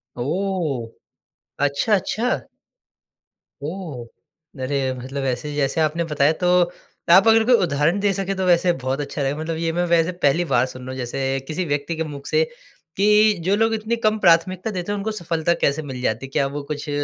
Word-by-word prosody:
ओह! 155 -3 -2 0.8
अच्छा, 145 +10 0
अच्छा। 225 +6 -2 1.3
ओह! 155 -7 -6 0.6
अरे 135 -1 -1
मतलब 135 +2 -5
ऐसे 130 +4 -2
जैसे 140 +2 0
आपने 155 +2 +1
बताया, 150 -2 +2
तो 180 +2 -2 0.6
आप 190 +5 +7
अगर 225 0 +6
कोई 250 - +4
उदाहरण 160 +4 +1
दे 200 0 +2
सकें, 195 0 -2
तो 190 - 0
वैसे 175 0 +4
बहुत 130 0 -3
अच्छा 145 0 -4
रहेगा। 140 +2 -1
मतलब 160 0 -3
ये 165 0 -1
मैं 175 +1 0
वैसे 165 +2 +3
पहली 165 +6 +3
बार 130 - +2
सुन 130 0 -9
रहा 130 +1 -7
हूँ 130 - -6
जैसे 135 +2 -2
किसी 175 +3 -2
व्यक्ति 145 +2 -2
के 160 - -2
मुख 145 -3 -8
से 475 - +3 0.5
कि 210 +1 +5
जो 195 +2 +3
लोग 225 +1 +2
इतनी 220 +2 -1
कम 215 0 +3
प्राथमिकता 185 +3 +3
देते 185 +1 -4
हैं, 205 - -1
उनको 215 +2 -2
सफ़लता 170 -4 0
कैसे 140 +2 +2
मिल 130 -4 -7
जाती 120 +2 -1
है? - - -11
क्या 135 0 +1
वो 145 +1 -5
कुछ? 145 +1 -7
160 Hz, 190 wpm, -22 LUFS, 140-190 Hz, 1.3 s, आप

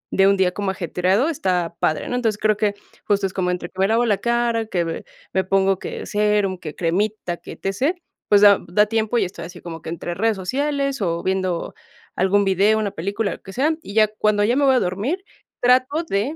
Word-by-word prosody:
de 195 0 +5
un 200 0 +4
día 185 -1 +2
como 200 0 -2
ajetreado 185 - 0
está 180 - -1
padre, 155 - 0
¿no? 245 - -2
Entonces 225 -4 0
creo 215 0 +2
que, 205 -1 0 0.3
justo 205 -1 +1
es 190 - -3
como 180 -2 -1
entre 180 -1 -3
que 190 - -14
me 195 - +4
lavo 230 +2 +2
la 210 -4 +2
cara, 235 -1 0
que 175 -5 0
ve 165 0 -5 0.3
me 190 - +2
pongo 195 0 +2
que - - -6
serum, 205 -3 +1
que 155 -4 -7
cremita, 180 +1 -1
que - - -10
e-t-c. 255 - -1 0.3
Pues 205 -1 +6
da 205 -1 +7
da 210 +5 +3
tiempo 220 +1 0
y - - +2
estoy 170 -2 -7
así 175 +1 -10
como 165 -2 -8
que - - -7
entre 170 +1 -4
redes 220 +4 +1
sociales 275 +6 -1
o 170 -3 -1
viendo 185 -2 -1 0.4
algún 195 +2 +2
video, 195 +3 +3
una 210 -2 -1
película, 200 +4 -2
lo - - -11
que 195 - -11
sea, 295 +7 +2
y 200 -8 -10
ya 215 -1 +5
cuando 210 -1 +1
ya 235 +4 +2
me 285 +1 +3
voy 265 -1 +5
a - - +4
dormir 215 - -2 0.4
trato 255 +6 +3
de 215 +11 -1
200 Hz, 225 wpm, -21 LUFS, 185-225 Hz, 0.4 s, da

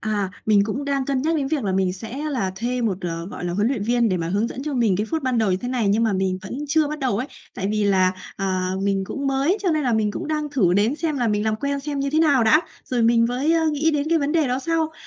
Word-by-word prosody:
À, 205 -3 -1 0.2
mình 205 -2 +4
cũng 260 +7 -3
đang 275 -1 0
cân 265 -1 -1
nhắc 320 +2 +1
đến 275 -2 -1
việc 290 -5 -1
là 195 - 0
mình 185 -1 +1
sẽ 225 +7 -7
là 215 -9 -1
thuê 245 +3 -2
một, 200 -5 0
ờ, 170 -2 -4
gọi 185 - -7
là, 175 - -2
huấn 205 +5 +1
luyện 260 -7 -1
viên 235 +1 +2
để 185 - 0
mà 165 -1 -3
hướng 205 +5 +1
dẫn 265 - -6
cho 300 -2 -3
mình 225 -7 +2
cái 210 +2 -1
phút 320 -2 -1
ban 255 -2 0
đầu 220 -3 +2
như 185 - +2
thế 245 +6 -5
này, 245 -5 0
nhưng 215 +3 +2
mà 220 - +1
mình 190 -1 0
vẫn 220 +8 -6
chưa 310 0 +2
bắt 305 +1 -4
đầu 260 -7 0
ấy. 250 +5 -2 0.3
Tại 195 +1 -2
vì 210 -1 0
là, 185 -2 +3 0.2
à, 185 -2 -1
mình 195 -1 0
cũng 275 - -4
mới, 275 +8 +2
cho 370 - +2
nên 310 -1 +1
là 250 -3 +1
mình 215 -2 +1
cũng - - -5
đang 300 -1 -1
thử 215 -12 +2
đến 215 +6 +2
xem 310 -4 -2
là 240 -2 +1
mình 210 0 0
làm 220 0 0
quen 280 +2 -2
xem 290 0 -4
như 275 0 -1
thế 310 - +1
nào 285 -7 +4
đã, 305 +8 +5 0.2
rồi 245 -2 -1
mình 230 0 +4
với 260 +7 0
á 330 -1 +2
nghĩ 310 +2 +2
đến 295 0 -1
cái 335 - +4
vấn 285 0 -1
đề 320 -4 +2
đó 250 +1 0
sau. 320 +1 -1
240 Hz, 305 wpm, -22 LUFS, 200-285 Hz, 0.3 s, đã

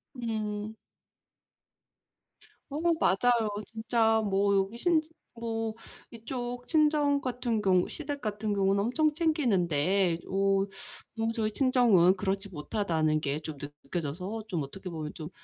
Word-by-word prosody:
음. 215 -3 -3 2.0
어 285 - -3 0.2
맞아요. 230 - +3 0.2
진짜 225 0 +1
뭐 200 -1 +2
여기 195 +4 0
신지 315 +3 +2 0.2
뭐 225 -1 -3 0.4
이쪽 245 +1 -5
친정 300 -2 +3
같은 245 -4 -1
경우 185 -2 +3
시댁 290 -3 -5
같은 210 -1 -2
경우는 195 0 +2
엄청 305 +7 +2
챙기는데 195 - +2
오 195 0 +2 0.5
너무 225 0 0
저희 220 -2 -1
친정은 230 -8 +4
그렇지 195 +1 -2
못하다는 160 -2 0
게 145 0 -1
좀 155 -1 -7
느 145 +1 -6
느껴져서 180 +8 -4
좀 175 -6 -2
어떻게 185 +7 -8
보면 155 -2 -5
좀 155 -1 -7
210 Hz, 245 characters per minute, -29 LUFS, 185-240 Hz, 2.0 s, 친정은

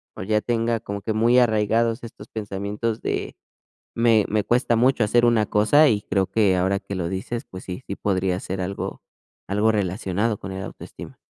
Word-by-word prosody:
o - - -6
ya 105 +2 +1
tenga 115 0 0
como 100 -2 -6
que 110 - -3
muy 115 +3 +4
arraigados 115 +1 +2
estos 110 -1 -12
pensamientos 105 +2 -3
de - - -3 0.6
me 115 -2 +4
me 105 0 0
cuesta 120 +1 +2
mucho 125 +1 +3
hacer 120 +3 +3
una 115 -2 +3
cosa, 130 +11 +4
y 105 -6 +2
creo 95 -1 0
que 100 -2 +2
ahora 95 +2 +1
que 100 - -7
lo 85 -2 -2
dices, 95 +5 -4
pues 95 0 -10
sí, 90 +7 -6
sí 100 - -5
podría 95 -2 0
ser 95 +1 -5
algo, 95 +2 -4 0.4
algo 105 +3 +2
relacionado 100 +1 -1
con 95 - -7
el 95 0 -5
autoestima. - - -10
105 Hz, 185 wpm, -23 LUFS, 95-115 Hz, 0.6 s, muy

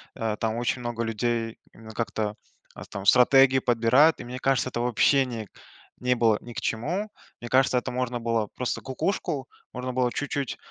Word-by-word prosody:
а, 110 -2 -2
там 110 -1 -1
очень 120 +1 -1
много 120 -1 -3
людей 115 0 -2 0.2
именно 110 0 -12
как-то, 105 -1 -2 0.4
а, - - -9
там 100 0 -7
стратегию 130 +4 +6
подбирают, 125 +7 +4
и, - - -8
мне 125 +1 -6
кажется, 135 -1 +1
это 120 - -4
вообще 125 +3 +3
не 115 -4 -6
к - - -41 0.5
не 125 0 +1
было 115 -3 +3
ни 120 - -10
к - - -4
чему. 175 - -2 0.3
Мне 120 - -8
кажется, 130 0 +3
это 125 - -2
можно 125 -1 -2
было 115 -2 0
просто 125 - -2
"Кукушку" 135 -1 -2 0.3
можно 125 0 -4
было 125 -1 +1
чуть-чуть, 140 -1 -3
120 Hz, 185 wpm, -26 LUFS, 115-130 Hz, 0.5 s, стратегию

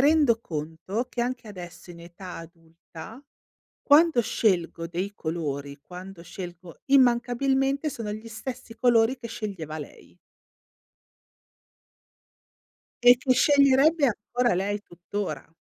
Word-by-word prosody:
rendo 285 -5 +4
conto 165 +8 -4
che, 240 - -3
anche 245 -1 -2
adesso 180 -3 -10
in 170 - -11
età 175 +2 -10
adulta, 165 - -12 0.6
quando 305 -2 +5
scelgo 175 -7 0
dei 185 +4 -4
colori, 145 -5 -4
quando 180 +1 -10
scelgo 175 -1 -9
immancabilmente 270 +3 +3
sono 225 -6 -5
gli 220 +2 -8
stessi 230 +1 -7
colori 240 +1 +3
che 235 -2 -8
sceglieva 190 -9 -5
lei 145 - -11 2.9
e 245 0 +9
che 260 +1 +1
sceglierebbe 280 +3 +5 0.3
ancora 245 -4 +3
lei 200 +3 -1
tuttora. 185 +1 -6
215 Hz, 105 wpm, -26 LUFS, 170-250 Hz, 2.9 s, e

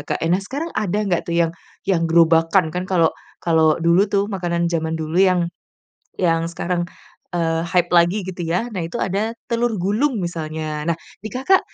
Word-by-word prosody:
Kak. - - -2
Nah, 180 +4 +2
sekarang 285 +11 -5
ada 205 -1 -1
nggak 175 -3 -1
tuh 170 - 0
yang 165 -1 +2 0.3
yang 170 -4 +1
gerobakan, 165 0 +4
kan 180 +1 -2
kalau 170 -4 +3 0.3
kalau 160 -2 +4
dulu 170 +5 +4
tuh, 200 0 +1
makanan 170 -3 -1
jaman 160 -1 -1
dulu 160 +2 -2
yang, 180 -3 +3 0.7
yang 165 -2 +2
sekarang, 175 +1 -2 0.5
eee, 165 -1 +1
hype 175 0 +1
lagi, 175 +4 +4
gitu 180 -1 -5
ya. 180 +8 0
Nah, 185 - -3
itu 165 - -5
ada 210 +5 -1
telur 235 -2 0
gulung 220 +7 +1
misalnya. 155 -2 -4
Nah, 170 - +1 0.3
di - - -3
Kakak, 270 +10 +3
175 Hz, 175 wpm, -21 LUFS, 165-195 Hz, 0.7 s, gerobakan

